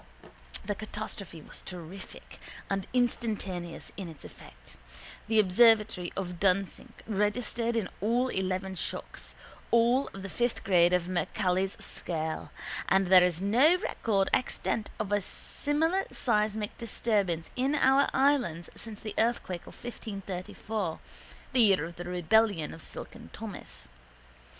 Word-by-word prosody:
The 205 - 0
catastrophe 200 -5 -7
was - - -7
terrific 180 +1 -9 0.3
and 195 -1 -1
instantaneous 210 -8 -1
in 195 -3 -5
its 160 - -12
effect. 60 0 -14 0.5
The 220 0 +2
observatory 210 -2 +4
of 180 -3 -3
Dunsink 195 0 0
registered 225 +3 0
in 220 -5 0
all 240 +5 +2
eleven 190 -1 -1
shocks, 185 - -4 0.3
all 235 +3 +4
of 195 - -9
the 195 - -5
fifth 240 +4 -1
grade 175 -2 +5
of 180 -1 +2
Mercalli's 185 +1 0
scale, 160 -2 -2 0.4
and 190 -1 +3
there 185 -1 +9
is 180 0 +2
no 260 - +5
record 210 - 0
extant 225 -3 0
of 210 -2 -2
a 205 0 +3
similar 320 - 0
seismic 215 -2 0
disturbance 200 -7 0
in 265 +4 +1
our 270 -1 +4
island 260 - +2
since 220 -2 -8
the 215 - -5
earthquake 220 -6 0
of - - -11
1534, 200 -4 -4 0.5
the 255 - +5
year 195 -7 +5
of 170 +1 -9
the 175 - -6
rebellion 180 0 +2
of 165 - -10
Silken 230 +7 -8
Thomas. 215 - -8
200 Hz, 130 wpm, -30 LUFS, 180-230 Hz, 0.5 s, there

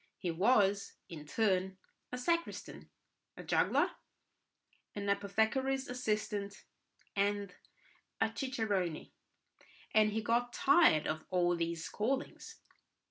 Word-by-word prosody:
He 180 - -2
was, 200 +2 +2 0.2
in 150 -3 -9
turn, 190 -1 +1 0.3
a 250 - -3
sacristan, 335 +6 -2 0.5
a - - -8
juggler, - - +2 1.0
an 205 -1 -4
apothecary's 220 +7 +1
assistant, 210 -4 -2 0.5
and 200 -1 0 0.7
a 225 - 0
cicerone, 205 - -2 0.8
and 215 -1 +5
he 220 +1 -2
got 240 +2 +1
tired 270 - +5
of 155 0 -3
all 175 -1 +2
these 170 -1 -2
callings. 260 +7 -3
205 Hz, 100 wpm, -33 LUFS, 185-240 Hz, 1.0 s, and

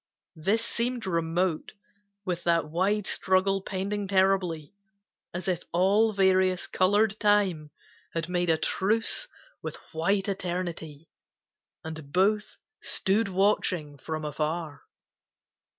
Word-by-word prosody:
This 210 +8 +1
seemed 235 0 -2
remote, 170 -1 -1 0.5
With 175 -2 -2
that 170 -2 +2
wide 195 +5 +1
struggle 195 +1 +1
pending 200 +1 -3
terribly, 190 -4 +1 0.6
As 175 +1 -5
if 180 -2 0
all 200 +5 +3
various, 190 -2 +2
colored 205 +3 +2
Time 200 -8 +2 0.5
had 165 -1 -1
made 175 -1 0
A 160 - +4
truce 220 - +1 0.3
with - - -5 0.2
white 195 +5 +1
Eternity, 175 -5 -4 0.8
and 160 -3 -8
both 205 +4 +1 0.2
Stood 205 +3 +2
watching 185 -6 +1
from 155 +2 -4
afar. 155 +1 -3
185 Hz, 105 wpm, -27 LUFS, 165-200 Hz, 0.8 s, A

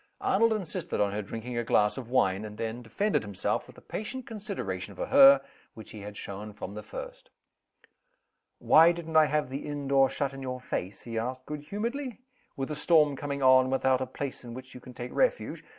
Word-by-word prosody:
Arnold 230 0 +3
insisted 195 -7 -3
on 100 -1 +2
her 105 +1 -2
drinking 115 +4 -5
a - - -1
glass 105 -2 +3
of 125 -3 -7
wine 95 -6 +2
and 105 -1 -8
then 115 +1 -4
defended 200 - 0
himself 100 -3 -2
with - - -15
the - - -16
patient 245 +4 -5
consideration 195 - -5
for - - -3
her 275 0 +8 0.3
which 110 - -11
he 110 - -9
had 105 +1 -8
shown 105 +2 -7
from 100 -1 -7
the 105 - -6
first. - - -9 1.3
"Why 165 +2 +6
didn't 165 -2 -7
I 155 -1 +8
have 150 -3 -1
the 135 - -5
inn 145 -1 -4
door 135 -1 +4
shut 140 -1 -2
in 135 - -8
your 130 -1 -4
face" 95 -5 -4
he 115 -1 -3
asked, 130 +2 -4
good 150 -1 -5
humoredly 235 - -4 0.4
"with 135 +2 -3
a - - -2
storm 150 -2 +4
coming 140 0 -4
on, 130 0 +7
and 130 - -3
without 130 -1 +2
a 130 - -2
place 135 +1 -5
in 120 -1 -8
which 130 0 -10
you 125 - -9
can 125 - -12
take 120 +1 -6
refuge? - - 0
130 Hz, 215 wpm, -29 LUFS, 115-165 Hz, 1.3 s, her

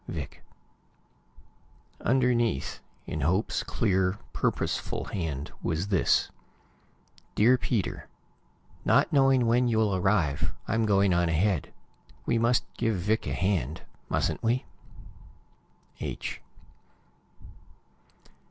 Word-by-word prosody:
Vic - - -6 1.6
Underneath, 120 - +1 0.3
in 75 - -4
Hope's 90 - +1
clear, 95 -3 +1 0.2
purposeful - - -1
hand, 80 -7 -4
was 85 +6 -2
this: 95 -4 +2 1.0
Peter 120 +5 +5
dear: 115 -7 -1 0.8
Not - - +3
knowing 135 -3 +4
when 120 +2 +3
you'll 110 -4 +2
arrive, 90 -7 +1
I'm 110 0 +1
going 100 -2 +4
on 85 -1 +2
ahead. 85 0 +1 0.5
We 115 - +1
must 120 +2 +2
give 115 -2 +1
Vic 105 +5 0
a - - -1
hand 85 -7 -1 0.3
mustn't - - 0
we? 120 +3 +1 1.3
H. - - -5
100 Hz, 95 wpm, -28 LUFS, 90-115 Hz, 1.6 s, Peter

